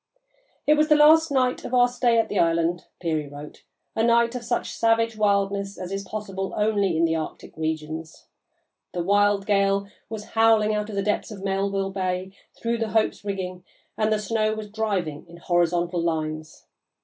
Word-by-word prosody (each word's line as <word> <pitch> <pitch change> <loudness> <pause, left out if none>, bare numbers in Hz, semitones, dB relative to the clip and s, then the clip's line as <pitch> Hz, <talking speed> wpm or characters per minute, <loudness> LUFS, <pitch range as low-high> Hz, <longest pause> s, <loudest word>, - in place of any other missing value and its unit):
"It 300 - +5
was 305 0 +3
the 305 - +5
last 315 +2 +6
night 255 -2 +1
of 255 - -2
our 245 0 +6
stay 245 -1 +1
at 225 -1 +2
the 205 - -1
island," 170 +1 +1
Peary 155 -4 -1
wrote, 145 +1 -11 0.3
"a 225 - +1
night 235 0 +3
of 250 -2 -5
such - - -2
savage 230 0 +2
wildness 200 -1 0
as 180 0 -6
is 195 0 -3
possible 195 -1 -5
only 205 -5 +1
in 165 - +3
the 165 0 +1
Arctic 160 -1 -6
regions.... 160 0 -4 0.7
The 175 - -2
wild 205 +1 +3
gale 200 -1 +2 0.2
was 215 -1 -7
howling 225 -1 +4
out 210 0 -2
of 210 - -6
the 200 - 0
depths 210 0 -1
of 200 -3 -9
Melville 195 0 -1
Bay 185 -1 -2 0.3
through 235 0 -2
the 225 -1 -1
Hope's 220 -1 0
rigging 185 -3 -4 0.3
and 215 0 +1
the 215 - +3
snow 215 +1 0
was 215 -1 -7
driving 195 -9 -2
in 170 - -12
horizontal 175 0 +1
lines. 155 -2 -3
200 Hz, 180 wpm, -24 LUFS, 175-220 Hz, 0.7 s, last